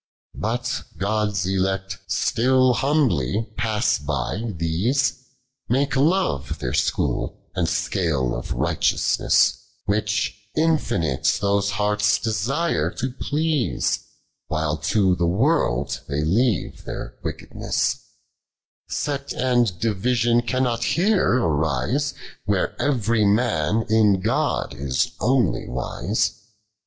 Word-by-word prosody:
But 120 +4 -2 0.2
Ood's 100 -1 0
ulect 95 0 -1
etiU 130 +1 +3
humbly 115 - +1
pass 110 0 +1
by 75 - -2
these, 90 - +1 0.6
Mulce 135 +4 +1
love 145 - +1
their 60 -1 -3
School, - - -1
and 90 -3 +1
6cale 80 -6 0
of - - -5
ngfati - - +2 0.3
Which 105 +1 0 0.2
infinite 120 - +1
those 100 0 +1
hearts 105 0 +2
desire 110 - 0
to 130 +7 -4
plcnsc, 150 +1 0 0.5
"While 75 -1 -1
to 95 +4 +2
the 85 - +1
world 100 - +1
they 70 +1 -1
leave 105 +6 0
their - - -6
trickednuas - - -2 0.9
8ect 140 -1 -3
and 120 -7 +1
division 115 +2 +2
cannot 120 -1 0
here 190 - +2
ariAc, 80 - 0 0.3
Where 100 -2 0
every 115 -6 +1
mun 105 -2 +2
in 110 -2 +4
Ood - - 0
is 70 -2 -1
only 125 +1 +1
wiae. 105 +1 -1
105 Hz, 100 wpm, -23 LUFS, 90-125 Hz, 0.9 s, in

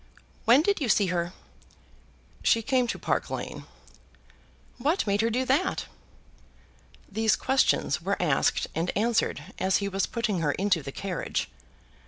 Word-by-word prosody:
"When 255 +6 +6
did 400 -2 +1
you 255 - 0
see 205 0 +4
her?" 170 0 -1 1.1
"She 230 - +3
came 255 0 +2
to - - -2
Park - - -1
Lane." - - -5 1.1
"What 305 +9 +1
made 200 0 +1
her 225 - +2
do 250 +3 0
that?" 275 +9 +1 1.2
These 220 +1 +2
questions 265 +1 +1
were - - -1
asked - - +2
and 165 +2 -1
answered 210 -6 0
as 190 0 +2
he 200 - -2
was 195 0 -1
putting 220 -6 -1
her 150 -3 +1
into 190 -4 +1
the 135 - -7
carriage. 185 +3 -3
215 Hz, 145 wpm, -27 LUFS, 190-250 Hz, 1.2 s, When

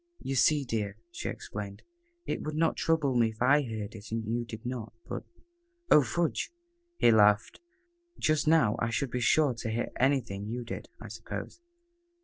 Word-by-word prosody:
"You 135 - -2
see, 140 +3 +3
dear," 105 -4 -2
she - - -4
explained, 100 -1 -7 0.4
"it - - -2
would 155 0 -4
not 165 +1 +2
trouble 155 -5 +1
me 115 -2 +4
if 110 -1 -12
I 140 +4 +5
heard 110 -6 -5
it 110 -1 -10
and 115 0 -2
you 120 +2 -1
did 115 0 -9
not 120 -3 -4
but - - -4 0.4
" 345 0 -33
"Oh, 150 - +9
fudge!" 155 - -1 0.5
he 120 - +5
laughed. 105 - +4 0.6
"Just 155 0 +1
now 155 -10 +4
I 115 - 0
should 130 +2 -1
be 125 - -1
sure 145 +2 +4
to 115 0 -5
hear 115 +2 -2
anything 120 -7 +1
you 120 +2 -3
did, 115 - -7
I - - -9
suppose." - - -7
120 Hz, 180 wpm, -30 LUFS, 110-145 Hz, 0.6 s, Oh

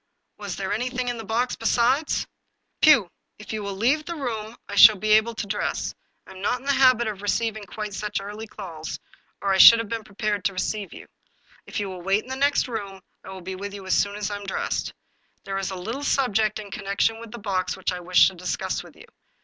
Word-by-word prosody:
Was 200 -3 -5
there 195 -1 -3
anything 250 +2 -2
in 240 -1 -4
the - - -6
box 230 +4 -1
besides? 245 +6 +1 0.2
" - - -50
" - - -50
Pugh, 285 - +6 0.3
if 210 - -8
you 215 - -3
will 200 -1 -4
leave 260 +10 +2
the 340 +2 -5
room 230 -6 -4
I - - -8
shall 215 +1 +9
be 215 +2 -1
able 220 +2 +4
to - - -3
dress; 205 +1 -2 0.3
I - - -14
am 190 0 -11
not 245 +5 0
in 260 - -16
the 280 - +2
habit 255 -4 +4
of 205 -2 -4
receiving 215 +1 -1
quite 210 +1 -6
such 210 +1 -3
early 210 +3 -7
calls, 165 -7 -7 0.5
or 195 -1 +2
I 190 - +1
should 230 - +11
have 230 -2 -4
been 230 -1 -3
prepared 205 -1 -2
to 195 - +1
receive 200 +1 -3
you. - - -11 0.6
If - - -4
you 205 - -2
will 185 -2 -7
wait 195 +4 +1
in 255 - -15
the - - -2
next 280 +1 +2
room, 200 -5 -6 0.2
I - - -11
will 190 -1 -8
be 190 +2 -6
with 200 +2 -6
you 195 -1 -9
as 185 - 0
soon 200 0 +1
as 210 0 -3
I'm 205 0 -5
dressed. 195 - -2 0.5
There 195 0 -3
is 195 - -2
a 190 - -5
little 225 +10 -5
subject 220 -7 +1
in 205 -2 -8
connection 200 +3 0
with 230 0 -9
the 240 - -7
box 195 -4 -2
which - - -1
I 180 - -4
wish 180 +1 +5
to - - -12
discuss 180 0 -3
with - - -15
you." - - -14
210 Hz, 240 wpm, -24 LUFS, 195-230 Hz, 0.6 s, should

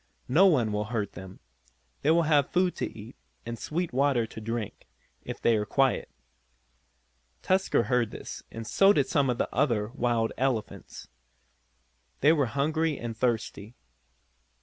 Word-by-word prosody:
No 175 +10 +5
one 125 - +2
will 105 0 -1
hurt 105 -3 -3
them. 95 0 -11 0.6
They 145 - +1
will 165 +1 +4
have 150 -3 +3
food 180 0 +1
to - - -2
eat, 110 +2 -11 0.3
and 115 -1 -6
sweet 170 +5 -3
water 135 -3 +2
to 110 - -10
drink, 115 -1 -5 0.3
if - - -7
they 115 - +3
are 105 - 0
quiet." 135 +4 +1 1.3
Tusker 190 -9 +2
heard 120 -1 +1
this, - - -8
and 115 0 -8
so 195 - +4
did 140 -7 +2
some 135 0 +1
of 125 - 0
the - - 0
other 115 -6 +1
wild 120 -3 0
elephants. 130 -4 -3 1.1
They 150 +4 +6
were 145 -5 +1
hungry 150 +5 0
and 115 -1 -5
thirsty. 115 -2 -2
125 Hz, 150 wpm, -28 LUFS, 115-150 Hz, 1.3 s, They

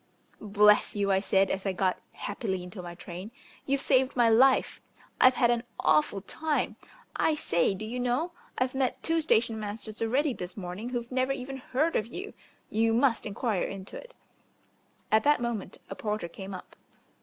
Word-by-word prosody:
"Bless 210 0 +4
you," 200 -1 +1
I 190 - +4
said, 195 0 +2
as 190 - -2
I 195 - -1
got 185 0 0
happily 200 -3 -3
into 180 +1 -8
my 175 -1 -8
train. 180 +4 -8 0.4
"You've 275 0 +1
saved 265 -1 +2
my 240 -2 +4
life. 260 +4 +4 0.4
I've 255 0 +7
had 240 -2 +4
an 240 -1 +1 0.2
awful 155 +5 +2
time. 310 +9 -2 0.4
I 315 - +2
say, 170 - +1
do 215 - -6
you 240 +3 -4
know, 250 +8 0 0.3
I've 255 0 0
met 265 -1 -1
two 330 0 +1
station 225 -6 +2
masters 215 +1 -6
already 260 +5 +1
this 180 -3 -7
morning 190 +5 -5
who've 240 -1 -4
never 260 +1 +1
even 270 0 -6
heard 280 +5 0
of 215 - 0
you. 375 - -7 0.4
You 225 +1 +2
must 240 -2 +2
enquire 210 -1 -1
into 195 -1 -5
it." - - -10 1.0
At 220 0 +4
that 295 -1 +4
moment 235 -4 -3
a - - -6
porter 210 -2 -3
came 190 +3 -8
up. 180 - -11
225 Hz, 180 wpm, -28 LUFS, 195-255 Hz, 1.0 s, I've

